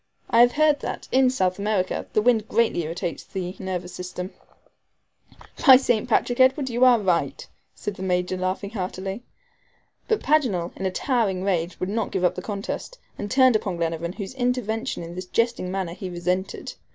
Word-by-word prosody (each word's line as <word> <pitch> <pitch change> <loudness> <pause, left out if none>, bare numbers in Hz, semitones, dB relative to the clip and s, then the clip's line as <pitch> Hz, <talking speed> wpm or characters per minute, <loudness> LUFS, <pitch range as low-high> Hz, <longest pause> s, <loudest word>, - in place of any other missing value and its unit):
I 230 - +5
have 245 0 +6
heard 300 -1 +3
that, - - -5
in 260 0 +5
South 185 -7 0
America, 200 -3 -1
the 215 - +2
wind 225 -3 +3
greatly 230 -7 +2
irritates 165 +1 -4
the 185 -1 -5
nervous 180 -2 -4
system." 180 +1 -6 1.4
"By 265 - +12
St. 245 -3 0
Patrick, 245 +1 +1
Edward 260 0 +4
you 240 +2 +1
are 250 -2 +7
right," 185 -4 0 0.3
said 205 -2 -5
the - - -8
Major, 180 0 0
laughing 185 +2 -2
heartily. 190 0 -4 0.9
But 440 - +1
Paganel, 240 - +1
in 190 - -2
a - - -2
towering 205 -4 0
rage, 180 -3 -1
would 185 - -2
not 220 +1 -1
give 190 - -1
up 180 - +3
the 185 - -6
contest, 205 - -5 0.2
and 205 - -4
turned 260 0 +5
upon 195 -4 -1
Glenarvan, 165 +1 -2
whose 200 +2 -6
intervention 245 -6 -1
in 170 +1 -8
this 180 +1 -6
jesting 230 -1 0
manner 185 -2 -3
he 185 +1 -6
resented. 180 +2 -3
195 Hz, 175 wpm, -24 LUFS, 180-240 Hz, 1.4 s, By